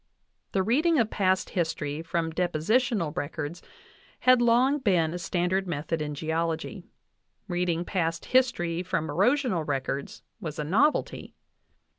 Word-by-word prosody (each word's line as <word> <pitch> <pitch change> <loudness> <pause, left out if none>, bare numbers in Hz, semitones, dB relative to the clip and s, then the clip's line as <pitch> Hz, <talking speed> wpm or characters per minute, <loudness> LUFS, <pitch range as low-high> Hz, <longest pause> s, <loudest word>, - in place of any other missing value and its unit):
The 190 - +2
reading 305 - +3
of 225 -4 +2
past 185 -2 +1
history 160 -3 -2
from 165 0 -2
depositional 180 - +1
records 155 0 -4 0.6
had 255 -1 +5
long 250 +5 +4
been 175 - +2
a 180 - -4
standard 185 +1 0
method 160 0 -2
in 150 -1 -3
geology; 165 +4 -2 0.6
reading 175 -2 -1
past 165 -4 -1
history 175 -10 +1
from 165 -4 -2
ero 195 - +4
sional 250 - -1
records 140 0 -3 0.2
was 155 -3 -6
a 150 - -2
novelty. 230 - +1
175 Hz, 130 wpm, -27 LUFS, 160-215 Hz, 0.6 s, had